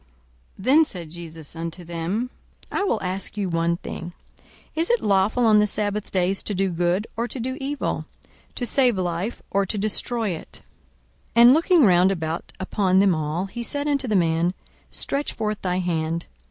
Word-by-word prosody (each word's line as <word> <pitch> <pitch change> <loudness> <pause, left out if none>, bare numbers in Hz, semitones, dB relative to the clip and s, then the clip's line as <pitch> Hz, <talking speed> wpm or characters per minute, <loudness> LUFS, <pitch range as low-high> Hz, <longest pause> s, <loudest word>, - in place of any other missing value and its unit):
42:006:009 190 - -10
Then 305 +5 +6
said 175 - -7
Jesus 165 -2 -9
unto 165 +2 -5
them, 175 +9 -3 0.4
I - - 0
will 235 - 0
ask 190 +3 -4
you 200 -3 -1
one 165 0 +1
thing; 170 0 -7 0.6
Is 325 +2 0
it 480 0 +3
lawful 205 +4 +3
on 215 -1 +6
the 210 - +3
sabbath 205 0 -1
days 190 +1 +1
to 205 - -3
do 190 0 +1
good, 175 +4 +1
or 235 +1 -1
to 255 - -6
do 260 +2 -3
evil? 280 +2 -2 0.5
to 245 - -2
save 250 -4 +4
life, 180 +5 -2
or 200 0 +2
to 210 - -2
destroy 215 +2 +1
it? 170 -3 -7 0.7
42:006:010 235 - +7
And 245 +2 +9
looking 330 -1 +5
round 180 0 +5
about 160 -3 -3
upon 190 0 +1
them 195 -1 +5
all, 155 +3 -2
he 230 +5 -6
said 285 +4 -2
unto 280 -3 +1
the 215 - +1
man, 170 0 +2 0.3
Stretch 280 +1 -3
forth 215 -2 -3
thy 180 -1 0
hand. 165 -2 -1
195 Hz, 180 wpm, -24 LUFS, 175-235 Hz, 0.7 s, And